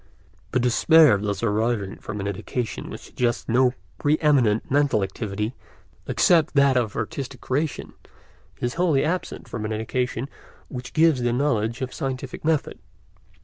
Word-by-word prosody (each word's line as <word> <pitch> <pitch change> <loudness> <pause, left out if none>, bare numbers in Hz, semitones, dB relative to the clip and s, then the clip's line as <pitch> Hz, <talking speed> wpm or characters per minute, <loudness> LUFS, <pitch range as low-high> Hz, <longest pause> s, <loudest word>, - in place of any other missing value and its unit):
The 130 - +1
despair 125 +1 +5
thus 100 -1 -3
arising 110 -2 0
from 105 -1 -6
an 100 - -3
education 110 +4 -4
which - - -8
suggests 120 -2 -2
no 125 +2 +3 0.2
pre 150 +2 +2
eminent 130 -10 +2
mental 140 -7 +3
activity 105 +2 -3 0.5
except 165 -3 +3
that 140 -2 +5
of 120 -5 0
artistic 125 +3 -4
creation 145 +6 -2 0.7
is 120 0 -2
wholly 155 -6 +3
absent 180 +3 -3
from 115 - -5
an 110 - -3
education 120 +3 -2 0.4
which 125 -2 -7
gives 155 -5 +4
the 120 0 +1
knowledge 120 -3 0
of 130 0 -3
scientific 130 -1 -5
method. 155 -2 0
125 Hz, 145 wpm, -24 LUFS, 110-140 Hz, 0.7 s, despair